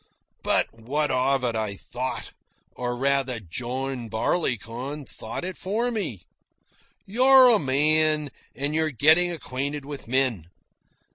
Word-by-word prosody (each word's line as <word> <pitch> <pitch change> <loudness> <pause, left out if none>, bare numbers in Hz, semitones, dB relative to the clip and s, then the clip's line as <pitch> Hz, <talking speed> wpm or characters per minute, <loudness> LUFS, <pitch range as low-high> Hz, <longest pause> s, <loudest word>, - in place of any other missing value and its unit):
"But - - +1
what 135 +6 -2
of 130 +1 +1
it?" 120 -2 0
I 110 -2 -2
thought, 125 +5 -5 0.4
or 120 0 -3
rather, 135 -2 0
John 125 +5 -4
Barleycorn 125 - -2
thought 115 +6 -7
it 185 0 -5
for 225 +6 -1
me. 170 - -3 0.8
"You're 255 +4 +7
a 225 -3 +5
man 150 +2 +2 0.2
and 145 +2 -1
you're 160 0 +1
getting 155 +6 +4
acquainted 140 -2 -4
with 145 -4 -8
men. 120 -9 0
135 Hz, 125 wpm, -25 LUFS, 120-155 Hz, 0.8 s, You're